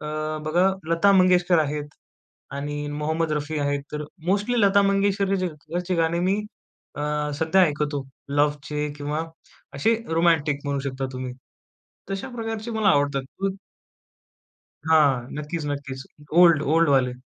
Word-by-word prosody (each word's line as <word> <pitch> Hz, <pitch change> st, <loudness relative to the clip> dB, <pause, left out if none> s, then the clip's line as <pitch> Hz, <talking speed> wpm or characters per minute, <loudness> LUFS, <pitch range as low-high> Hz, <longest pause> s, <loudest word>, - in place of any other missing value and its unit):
अ, 150 Hz, -, -7 dB, 0.4 s
बघा 175 Hz, +4 st, +3 dB, 0.2 s
लता 170 Hz, +4 st, +4 dB
मंगेशकर 180 Hz, -2 st, +4 dB
आहेत 150 Hz, 0 st, -2 dB, 0.7 s
आणि 145 Hz, +1 st, -4 dB
मोहम्मद 155 Hz, +2 st, -1 dB
रफी 150 Hz, +1 st, -2 dB
आहेत 145 Hz, -1 st, -1 dB
तर 150 Hz, 0 st, -3 dB, 0.2 s
मोस्टली 205 Hz, +6 st, +1 dB
लता 200 Hz, 0 st, +5 dB
मंगेशकरचे 190 Hz, -4 st, 0 dB
गाणे 165 Hz, +1 st, +1 dB
मी 185 Hz, +3 st, +2 dB, 0.6 s
अ, 145 Hz, -, -3 dB, 0.4 s
सध्या 160 Hz, +5 st, +3 dB
ऐकतो. 150 Hz, -3 st, 0 dB, 0.2 s
लव्हचे 150 Hz, +1 st, 0 dB
किंवा 150 Hz, +2 st, -2 dB, 0.5 s
असे 145 Hz, +12 st, +2 dB, 0.2 s
रोमॅन्टिक 160 Hz, -4 st, +2 dB
म्हणू 140 Hz, -1 st, -1 dB
शकता 135 Hz, -1 st, -3 dB
तुम्ही. 130 Hz, -1 st, -5 dB, 0.8 s
तशा 195 Hz, +7 st, -4 dB
प्रकारचे 225 Hz, 0 st, -4 dB
मला 220 Hz, -2 st, +2 dB
आवडतात 140 Hz, -3 st, +2 dB, 0.2 s
खूप. 195 Hz, 0 st, -1 dB, 1.3 s
हां. 145 Hz, -6 st, +4 dB
नक्कीच, 150 Hz, +1 st, -4 dB
नक्कीच. 140 Hz, -2 st, -5 dB, 0.4 s
ओल्ड, 170 Hz, -4 st, +6 dB
ओल्डवाले. 135 Hz, -6 st, +3 dB
155 Hz, 120 wpm, -24 LUFS, 145-185 Hz, 1.3 s, ओल्ड